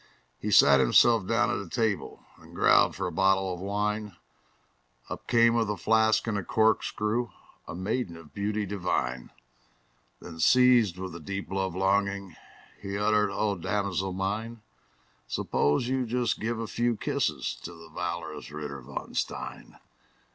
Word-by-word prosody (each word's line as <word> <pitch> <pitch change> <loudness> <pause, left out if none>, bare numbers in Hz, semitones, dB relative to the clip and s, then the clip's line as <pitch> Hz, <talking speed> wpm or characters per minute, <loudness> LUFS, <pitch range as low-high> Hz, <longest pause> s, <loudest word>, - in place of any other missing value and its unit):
He - - -3
sat 70 -1 +7
himself 95 - +4
down 120 +1 +2
at 100 - -2
a - - -12
table, 110 -4 -2
And - - -15
growled - - +4
for 95 - -3
a 90 - -2
bottle 95 +1 +2
of 90 - -7
wine; 105 +1 -2 0.9
Up - - -7
came 115 -1 +4
with 115 -3 +1
a 105 - -2
flask 110 +3 +3
and 110 -3 -1
a - - -5
corkscrew 110 +2 +1 0.4
A - - -6
maiden 95 -1 -3
of 80 -3 -15
beauty 105 +1 -2
divine. 90 -11 -2 0.9
Then, 80 -1 -10
seized 120 -3 +5
with 95 -2 -6
a - - -7
deep 95 +2 -6
love 95 -2 -2
longing, 100 -1 0 0.5
He 100 0 -4
uttered, 105 0 +2
"O 100 +1 -1
damosel 95 0 -2
mine, 105 +4 -3 0.6
Suppose 75 - 0
you 130 -1 -1
just 120 0 0
give 115 +1 -2
a 115 - -3
few 120 +1 -1
kisses - - -1
To 85 - -7
the 85 -1 -13
valorous 80 - -5
Ritter 75 -2 -6
von 60 - -7
Stein!" - - -5
100 Hz, 155 wpm, -28 LUFS, 90-110 Hz, 0.9 s, sat